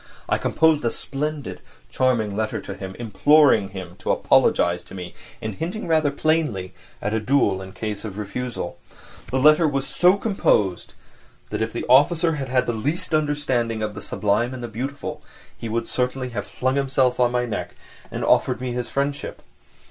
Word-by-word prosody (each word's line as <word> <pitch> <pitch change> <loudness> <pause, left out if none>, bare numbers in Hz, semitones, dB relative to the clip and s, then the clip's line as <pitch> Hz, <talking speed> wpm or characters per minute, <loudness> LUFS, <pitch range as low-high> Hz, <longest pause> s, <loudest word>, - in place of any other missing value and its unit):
I - - +1
composed 160 -2 +3
a 120 - +2
splendid, 145 +3 -4 0.3
charming 115 -6 +1
letter 110 +1 -1
to 100 - -7
him, 95 -1 -7
imploring 120 0 +4
him 95 -3 -8
to - - -6
apologise 90 0 +3
to - - -11
me, 90 -2 -7 0.3
and 110 -1 -3
hinting 175 - -4
rather 155 -3 +3
plainly 140 - 0 0.3
at 105 - -1
a 110 - +1
duel 105 -5 +2
in 95 0 -9
case 105 0 -4
of 105 -3 -6
refusal. 105 -2 -5 0.5
The 130 - 0
letter 155 +4 +6
was 135 -2 -1
so 180 +2 +4
composed 105 - +1 0.6
that - - -2
if 110 0 -1
the 120 - -4
officer 160 +6 +5
had 135 -2 -4
had 125 0 +2
the 120 - -1
least 145 +10 -2
understanding 140 -7 0
of 105 -1 -2
the - - -8
sublime 115 +5 0
and 125 - -7
the - - -3
beautiful 130 +6 -5 0.3
he 115 - -6
would 115 +1 -1
certainly 125 0 -1
have 110 -4 -5
flung 130 +2 -1
himself 135 -2 +1
on 120 -1 +4
my 125 0 +1
neck 115 - -4 0.3
and - - -5
have - - 0
offered - - +3
me 125 -1 -3
his 120 0 -3
friendship. 140 +1 -3
125 Hz, 180 wpm, -23 LUFS, 105-145 Hz, 0.6 s, letter